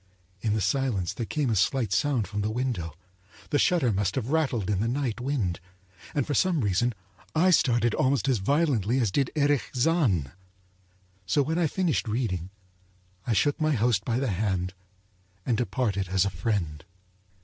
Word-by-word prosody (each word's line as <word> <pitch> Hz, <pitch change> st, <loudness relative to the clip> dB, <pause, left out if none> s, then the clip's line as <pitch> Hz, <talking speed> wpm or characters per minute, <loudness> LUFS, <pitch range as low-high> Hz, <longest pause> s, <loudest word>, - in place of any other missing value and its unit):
In 105 Hz, -1 st, 0 dB
the 110 Hz, -, 0 dB
silence 120 Hz, -, 0 dB
there 115 Hz, -, -4 dB
came 145 Hz, -6 st, 0 dB
a -, -, +1 dB
slight 110 Hz, +1 st, +1 dB
sound 135 Hz, -8 st, +1 dB
from 105 Hz, 0 st, -3 dB
the 105 Hz, -, -1 dB
window 110 Hz, -, -3 dB, 0.3 s
— 95 Hz, +2 st, -23 dB
the 145 Hz, -, +2 dB
shutter 145 Hz, -11 st, +3 dB
must 95 Hz, -1 st, 0 dB
have 130 Hz, 0 st, -2 dB
rattled 135 Hz, -10 st, +1 dB
in 100 Hz, -2 st, 0 dB
the 110 Hz, -, 0 dB
night 125 Hz, -2 st, -2 dB
wind, 120 Hz, -10 st, -1 dB, 0.6 s
and 145 Hz, -4 st, +1 dB
for 145 Hz, -, -2 dB
some 175 Hz, -2 st, +2 dB
reason 110 Hz, +3 st, +1 dB, 0.4 s
I 180 Hz, +4 st, +4 dB
started 120 Hz, -8 st, +3 dB
almost 135 Hz, 0 st, +1 dB
as 130 Hz, -5 st, +2 dB
violently 130 Hz, -, +1 dB
as 115 Hz, -6 st, +1 dB
did 135 Hz, +4 st, +1 dB
Erich 145 Hz, -2 st, +1 dB
Zann. 125 Hz, -, +2 dB, 1.0 s
So 140 Hz, +11 st, +3 dB
when 160 Hz, +5 st, -1 dB
I 165 Hz, -3 st, +2 dB
had -, -, -17 dB
finished 175 Hz, -10 st, 0 dB
reading, 105 Hz, -6 st, -2 dB, 0.8 s
I 120 Hz, -, +2 dB
shook 145 Hz, +8 st, +1 dB
my 155 Hz, 0 st, +2 dB
host 115 Hz, -4 st, +2 dB
by 115 Hz, +1 st, -1 dB
the 130 Hz, -3 st, 0 dB
hand, 95 Hz, -2 st, -1 dB, 0.7 s
and 120 Hz, -, +1 dB
departed 105 Hz, -3 st, -1 dB
as 95 Hz, 0 st, +2 dB
a 100 Hz, -, -1 dB
friend. 85 Hz, -5 st, -2 dB
120 Hz, 180 wpm, -27 LUFS, 100-140 Hz, 1.0 s, I